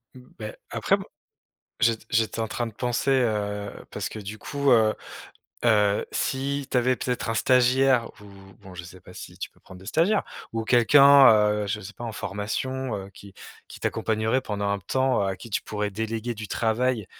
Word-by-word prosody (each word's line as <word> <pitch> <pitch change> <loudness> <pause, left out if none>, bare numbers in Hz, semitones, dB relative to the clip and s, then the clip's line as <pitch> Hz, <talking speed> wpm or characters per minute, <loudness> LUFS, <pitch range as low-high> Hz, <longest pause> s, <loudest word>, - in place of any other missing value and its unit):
Mmh 130 - -12 0.2
beh, 110 -1 -6 0.2
après - - +2
m - - -6 0.8
j'ét 115 -1 +1
j'étais 115 -1 0
en 110 - -1
train 120 +2 -3
de 115 - -10
penser, 125 +4 -1
heu, 105 -5 0 0.2
parce - - -4
que 110 - -8
du 105 +1 -7
coup, 140 +4 0
heu 110 -2 +5 0.7
heu, 105 -3 +3
si 140 +1 -2
tu - - 0
avais 125 +1 +2
peut-être 125 -1 -3
un - - -1
stagiaire 125 +1 +3
ou - - -14 0.4
bon 95 -2 -13
je 90 - -7
sais 90 +2 -13
pas - - -15
si - - -10
tu - - -5
peux - - -29
prendre 95 - -14
des 95 - -14
stagiaires, 185 - +2 0.3
ou 115 0 -2
quelqu'un, 140 +4 +7
heu, 105 -1 +3
je 105 +1 -3
sais 105 0 -9
pas 120 - -9
en 115 - -4
formation, 110 +5 -3
heu, 95 0 -8
qui 100 0 -14 0.3
qui - - -12
t'accompagnerait 110 +3 0
pendant 100 -5 -3
un 100 - 0
temps, 130 +5 0
heu, - - 0
à 95 - -3
qui 115 - -12
tu - - -1
pourrais 105 -1 -3
déléguer 110 +3 -3
du 105 -1 -7
travail, 115 -1 0
110 Hz, 200 wpm, -25 LUFS, 105-125 Hz, 0.8 s, quelqu'un